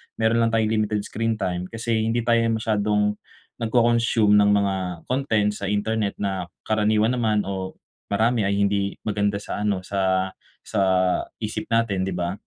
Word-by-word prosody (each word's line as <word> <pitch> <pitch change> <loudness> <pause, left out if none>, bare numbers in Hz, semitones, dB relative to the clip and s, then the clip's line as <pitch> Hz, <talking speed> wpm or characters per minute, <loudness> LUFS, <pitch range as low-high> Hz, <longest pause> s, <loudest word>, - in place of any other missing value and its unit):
meron 115 +1 +2
lang 115 - 0
tayong 110 -1 +2
limited 105 -1 0
screen 115 0 -2
time 90 -4 -2
kasi 115 -1 -1
hindi 115 +1 0
tayo 115 -1 +4
masyadong, 105 -1 +1 0.5
nag-co-consume 115 -2 +3
ng 105 0 +4
mga 100 -1 +1 0.3
content 110 -6 +1
sa 100 -2 -4
internet 105 0 -1
na 95 -3 -3 0.2
karaniwan 110 +2 +2
naman 110 -4 +1
o 95 -1 -5 0.3
marami 110 +3 +2
ay 100 0 0
hindi 100 -1 0
maganda 100 -1 0
sa 100 - -5
ano, 105 -2 0
sa 95 -1 0 0.3
sa - - -1 0.6
isip - - -5
natin, 115 -5 +1
di - - -2
ba? 90 +1 -2
105 Hz, 155 wpm, -23 LUFS, 100-115 Hz, 0.6 s, tayo